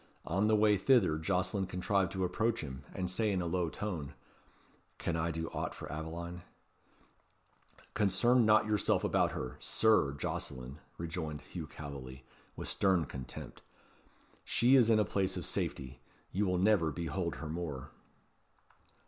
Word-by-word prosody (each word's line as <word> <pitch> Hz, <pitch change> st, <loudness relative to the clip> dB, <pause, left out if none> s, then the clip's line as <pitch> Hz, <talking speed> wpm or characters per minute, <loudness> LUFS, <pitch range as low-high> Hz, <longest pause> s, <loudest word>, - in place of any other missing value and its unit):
On 95 Hz, +6 st, +1 dB
the 110 Hz, -, +4 dB
way 105 Hz, -1 st, +4 dB
thither 95 Hz, -9 st, +4 dB
Jocelyn 95 Hz, +3 st, 0 dB
contrived 95 Hz, 0 st, 0 dB
to 95 Hz, -1 st, -1 dB
approach 115 Hz, +5 st, 0 dB
him, 65 Hz, -2 st, -7 dB
and 95 Hz, -2 st, -3 dB
to 90 Hz, -, -3 dB
say 110 Hz, +2 st, +1 dB
in 95 Hz, -, 0 dB
a 90 Hz, -, -2 dB
low 85 Hz, 0 st, 0 dB
tone 80 Hz, -8 st, -4 dB, 0.8 s
"Can 85 Hz, -, -2 dB
I 80 Hz, +1 st, 0 dB
do 80 Hz, 0 st, -3 dB
aught -, -, -4 dB
for -, -, -7 dB
Aveline?" 85 Hz, +3 st, -5 dB, 1.5 s
"Concern 115 Hz, +5 st, +4 dB
not 110 Hz, 0 st, +5 dB
yourself 105 Hz, -2 st, +2 dB
about -, -, +2 dB
her, 65 Hz, -, -5 dB
Sir 110 Hz, -11 st, +3 dB
Jocelyn," 65 Hz, 0 st, -5 dB, 0.2 s
rejoined 80 Hz, -3 st, -4 dB
Hugh 85 Hz, -4 st, -7 dB
Calveley, 70 Hz, -4 st, -8 dB, 0.3 s
with -, -, -5 dB
stern 95 Hz, -4 st, +2 dB
contempt. 65 Hz, -2 st, -8 dB, 0.8 s
"She 125 Hz, +4 st, +4 dB
is 120 Hz, -4 st, +6 dB
in 110 Hz, -, +5 dB
a 105 Hz, -, +3 dB
place 95 Hz, 0 st, 0 dB
of 90 Hz, -, -4 dB
safety. 65 Hz, 0 st, -3 dB, 0.3 s
You 100 Hz, +2 st, +1 dB
will 90 Hz, 0 st, +1 dB
never 95 Hz, -3 st, +3 dB
behold 85 Hz, +1 st, -2 dB
her 80 Hz, -, -6 dB
more." 75 Hz, -5 st, -5 dB
90 Hz, 150 wpm, -33 LUFS, 80-105 Hz, 1.5 s, is